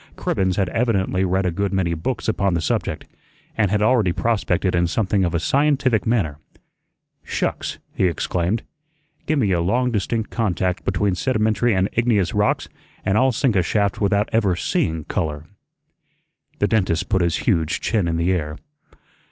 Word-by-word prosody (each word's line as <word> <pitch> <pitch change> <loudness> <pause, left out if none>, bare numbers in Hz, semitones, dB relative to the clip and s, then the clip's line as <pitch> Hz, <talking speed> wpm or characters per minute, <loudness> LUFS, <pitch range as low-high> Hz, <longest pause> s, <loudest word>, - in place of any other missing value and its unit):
Cribbens 95 -1 0
had 95 -2 +1
evidently 100 -5 0
read 95 +1 +1
a 90 - +1
good 100 +3 -1
many 95 -3 0
books 105 +9 -3
upon 100 -4 +1
the - - +1
subject, 80 - -2 0.5
and 105 -3 +2
had 105 +1 +1
already 110 -5 +3
prospected 95 -2 0
in 85 0 +2
something 100 +1 0
of 85 -1 0
a - - +2
scientific 135 - +1
manner. 90 -11 0 0.8
"Shucks!" - - -2 0.2
he - - +1
exclaimed. 90 +5 -1 0.6
"Gi' 155 - +2
me 110 -9 +1
a 85 -2 +2
long 125 +8 +1
distinct 110 +1 -2
contact 95 -5 -1
between 95 +1 +1
sedimentary 110 +1 +1
and 95 +1 +2
igneous 110 -7 +1
rocks, - - +1 0.4
an' 95 - +1
I'll 130 +4 +4
sink 120 -1 +1
a 95 - +4
shaft 100 +3 0
without 100 +1 +2
ever 105 -5 +2
SEEING 80 -2 -1
'color.'" 75 -4 -3 1.1
The - - +1
dentist 90 -6 +1
put 95 - +1
his 85 -2 +1
huge 80 -1 +1
chin 105 -6 0
in 80 0 0
the 85 +2 +1
air. 75 -4 -2
95 Hz, 165 wpm, -21 LUFS, 90-110 Hz, 1.1 s, I'll